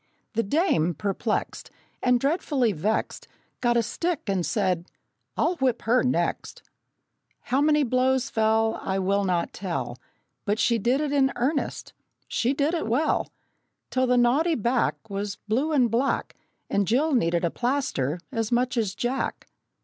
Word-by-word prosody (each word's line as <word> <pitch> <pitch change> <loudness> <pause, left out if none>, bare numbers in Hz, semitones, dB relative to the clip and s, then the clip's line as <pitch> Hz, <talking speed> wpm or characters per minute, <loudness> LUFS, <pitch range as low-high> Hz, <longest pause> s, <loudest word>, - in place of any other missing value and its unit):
The 230 - +1
dame, 200 - +1
perplexed 205 - -2 0.3
And 250 -1 +3
dreadfully 275 -4 +1
vexed, 205 +5 -2 0.3
Got 240 -1 +2
a 235 - +3
stick 335 +7 -2
and 195 -4 0
said, 185 -4 0 0.5
"I'll 350 +1 +1
whip 255 -3 0
her 240 +3 +3
next!" 255 - -1 0.8
How 265 +3 0
many 300 0 +4
blows 260 +1 +1
fell 220 0 +2
I 190 0 -2
will 200 +1 +1
not 180 -3 0
tell, 135 -10 -4 0.4
But 205 +1 0
she 235 0 +2
did 245 +7 +1
it 300 -2 -1
in 275 -2 +3
earnest, 280 +5 -2 0.3
she 245 - 0
did 285 +3 0
it 330 -9 -1
well, 265 +8 +1 0.6
Till 260 0 +1
the 250 0 +3
naughty 280 +8 +3
back 240 +3 0
Was 200 0 -4
blue 260 +9 +1
and 255 -6 +3
black, 255 +4 0 0.3
And 200 -2 0
Jill 285 +7 +2
needed 170 -7 +2
a 170 - 0
plaster 240 - -1
as 225 -3 -2
much 245 +1 +1
as 210 -4 0
Jack! 245 +4 -2
240 Hz, 150 wpm, -25 LUFS, 200-270 Hz, 0.8 s, many